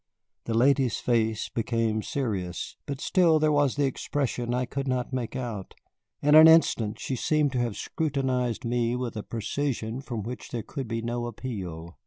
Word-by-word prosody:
The 115 - -1
lady's 130 0 +3
face 110 -2 0
became 115 -1 0
serious, 100 -10 -3
but 140 -2 -4
still 170 -1 +4
there 155 0 +3
was 145 -3 +2
the 145 -1 +2
expression 130 -2 -2
I 125 +1 0
could 135 +2 -4
not 130 0 -1
make 125 -1 -3
out. 115 -7 -5 0.5
In 150 +1 +4
an 155 +1 +10
instant 120 -10 +4
she 130 - -3
seemed 150 +2 +1
to 130 - -1
have 120 -4 -1
scrutinized 130 -7 -1
me 120 0 0
with 125 -2 -3
a 105 - -3
precision 115 +1 -3
from 120 -6 -5
which 120 +3 -7
there 115 -3 -4
could 135 -4 -6
be 115 0 -3
no 120 0 -2
appeal. 95 -9 -6
125 Hz, 175 wpm, -27 LUFS, 115-140 Hz, 0.5 s, an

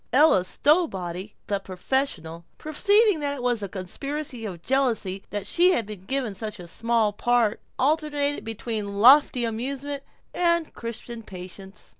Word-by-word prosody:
Ella 260 - +5
Stowbody, 195 - 0
the 200 -1 -1
professional, 185 - -2
perceiving 400 +5 +3
that 285 -1 -1
it 255 - -7
was 245 -2 +1
because - - -5
of 200 - -3
a 195 - -9
conspiracy 275 +3 -4
of 175 -4 -8
jealousy 230 -8 0
that 205 -1 -4
she 360 +2 +4
had 235 - 0
been 205 -3 -10
given 255 -5 -2
a 215 -1 -3
small 225 +3 0
part, 235 0 +1 0.2
alternated 290 0 0
between 215 -2 -4
lofty 250 +2 +6
amusement 275 +5 -3 0.3
and 340 -2 +1
Christian 230 0 -7
patience. 190 0 -11
235 Hz, 145 wpm, -25 LUFS, 200-285 Hz, 0.3 s, lofty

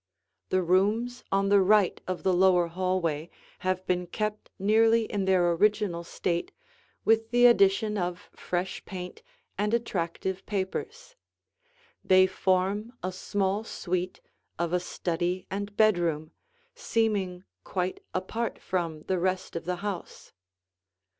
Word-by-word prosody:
The 185 0 +2
rooms 215 +8 +1
on 195 0 +2
the 200 -1 +6
right 200 0 +3
of 185 -1 -3
the 190 - +3
lower 180 -1 +5
hallway 170 -3 -1 0.3
have 185 0 -1
been 180 -1 0
kept 215 +3 -3
nearly 225 +3 +4
in 205 -3 -2
their 180 -2 +3
original 200 -1 +1
state 170 0 -2 0.5
with 225 0 +3
the 245 +1 +5
addition 210 -2 +4
of 175 0 -4
fresh 180 +1 -3
paint 180 -2 -7 0.4
and 210 +2 +2
attractive 190 -3 -2
papers. 435 - -4 0.9
They 185 0 +6
form 190 +4 0
a 185 - -1
small 195 +2 -1
suite 185 -4 -3 0.4
of 170 0 -1
a 180 - +3
study 175 +1 -2
and 205 +1 -4
bedroom, 170 -7 +2 0.4
seeming 200 -5 -1 0.2
quite 185 0 -2
apart 225 +5 -3
from 165 -4 -3
the 185 -1 -1
rest 185 0 -1
of 165 - -4
the 180 +1 -1
house. 195 -4 -6
185 Hz, 125 wpm, -28 LUFS, 180-210 Hz, 0.9 s, the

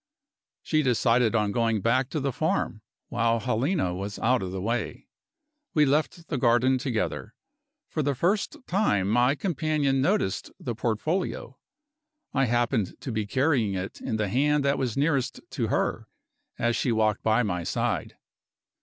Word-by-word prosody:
She 155 - +2
decided 120 -3 +2
on 105 -2 +2
going 115 -1 +1
back 125 +5 +1
to 155 - -2
the 140 0 -1
farm, - - -1 0.3
while 115 +1 +1
Helena 125 - 0
was 100 +3 -5
out 125 +2 +2
of 95 -1 -4
the 95 - -4
way. 115 +6 -3 0.7
We 150 -1 +5
left 155 +4 0
the 145 - -2
garden 125 +2 +3
together. 115 -4 -3 0.5
For 155 - -2
the 140 -1 0
first 195 - 0
time, 170 - +1
my 120 +6 +3
companion 150 -5 0
noticed 160 - 0
the 120 - -3
portfolio. 120 - -2 0.7
I 135 -1 +3
happened 120 -3 0
to 130 - -5
be 110 -2 -2
carrying 130 -5 +1
it 95 +1 -5
in - - -2
the 105 -1 0
hand 145 +5 +2
that 140 0 +2
was 125 -3 -2
nearest 140 -2 +1
to - - -1
her, - - -1 0.5
as 120 -1 +1
she 125 - 0
walked 110 -1 +1
by 110 +2 +2
my 90 -5 -2
side. - - -2
125 Hz, 155 wpm, -26 LUFS, 110-140 Hz, 0.7 s, We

